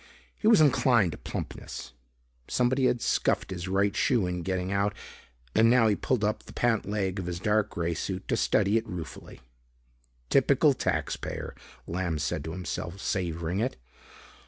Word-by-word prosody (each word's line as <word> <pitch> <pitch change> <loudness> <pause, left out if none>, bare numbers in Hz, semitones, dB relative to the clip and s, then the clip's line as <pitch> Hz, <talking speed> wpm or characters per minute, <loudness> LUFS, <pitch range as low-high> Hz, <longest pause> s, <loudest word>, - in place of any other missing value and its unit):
He 215 - -1
was 220 -6 +7
inclined 125 - +4
to - - -9
plumpness. - - -6 0.5
Somebody 130 +1 +2
had 120 - 0
scuffed - - +1
his 90 0 -4
right 100 +1 +1
shoe 120 -7 +2
in 90 0 -2
getting 95 +1 -2
out 100 +1 +1 0.6
and 115 +1 +5
now 120 -1 +5
he 105 - +3
pulled 125 0 -1
up 105 +1 0
the - - -14
pant 115 -4 +1
leg 100 -2 -1
of 90 - -4
his 85 -1 -3
dark 105 +2 +1
grey 85 0 -2
suit 95 +3 -4
to - - +2
study 105 +2 +2
it 115 - -2
ruefully. 85 -7 -8 0.9
"Typical - - +4
taxpayer," - - -3 0.3
Lamb 85 -2 -2
said 75 -1 -2
to 80 - -4
himself, 90 +1 -5
savoring 85 -2 -2
it. 125 +4 -1
100 Hz, 160 wpm, -28 LUFS, 90-115 Hz, 0.9 s, was